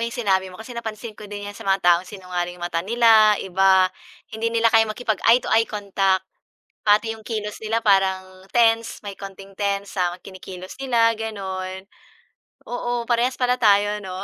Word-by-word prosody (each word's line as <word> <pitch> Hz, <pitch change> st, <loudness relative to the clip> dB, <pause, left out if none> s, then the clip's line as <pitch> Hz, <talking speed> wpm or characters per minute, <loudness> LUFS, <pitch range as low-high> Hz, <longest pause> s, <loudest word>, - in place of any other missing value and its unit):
'yung 235 Hz, +1 st, -3 dB
sinabi 190 Hz, -5 st, +1 dB
mo 185 Hz, -, -12 dB
kasi 225 Hz, +3 st, -10 dB
napansin 225 Hz, -1 st, -6 dB
ko 210 Hz, -1 st, -12 dB
din 205 Hz, 0 st, -7 dB
'yan 205 Hz, -, -6 dB
sa -, -, -13 dB
mga 195 Hz, 0 st, +2 dB
taong 175 Hz, +1 st, +4 dB
sinungaling 180 Hz, -2 st, -5 dB
'yung 175 Hz, -, -6 dB
mata 165 Hz, -1 st, -1 dB
nila, 220 Hz, +1 st, +5 dB
iba, 190 Hz, 0 st, +3 dB, 0.4 s
hindi 220 Hz, +1 st, -1 dB
nila 230 Hz, 0 st, +2 dB
kayang 225 Hz, -1 st, +5 dB
makipag-eye 230 Hz, +1 st, +2 dB
to -, -, -4 dB
eye 225 Hz, +1 st, +3 dB
contact. 195 Hz, -2 st, 0 dB, 0.6 s
Pati 215 Hz, +2 st, +3 dB
'yung 220 Hz, -, -13 dB
kilos 210 Hz, -2 st, -4 dB
nila 225 Hz, +1 st, -1 dB
parang 190 Hz, -1 st, +1 dB
tense, 230 Hz, -1 st, +2 dB
may 200 Hz, -, -5 dB
konting 195 Hz, 0 st, -10 dB
tense 200 Hz, -1 st, -2 dB
sa 175 Hz, -1 st, +1 dB
kinikilos 185 Hz, -1 st, -10 dB
nila, 235 Hz, -4 st, +3 dB
gano'n. 190 Hz, -3 st, -5 dB, 0.8 s
Oo, 245 Hz, 0 st, -2 dB
parehas 245 Hz, +2 st, +1 dB
pala 250 Hz, 0 st, +1 dB
tayo, 205 Hz, -1 st, +3 dB
'no? 190 Hz, -2 st, -7 dB
205 Hz, 175 wpm, -22 LUFS, 190-230 Hz, 0.8 s, nila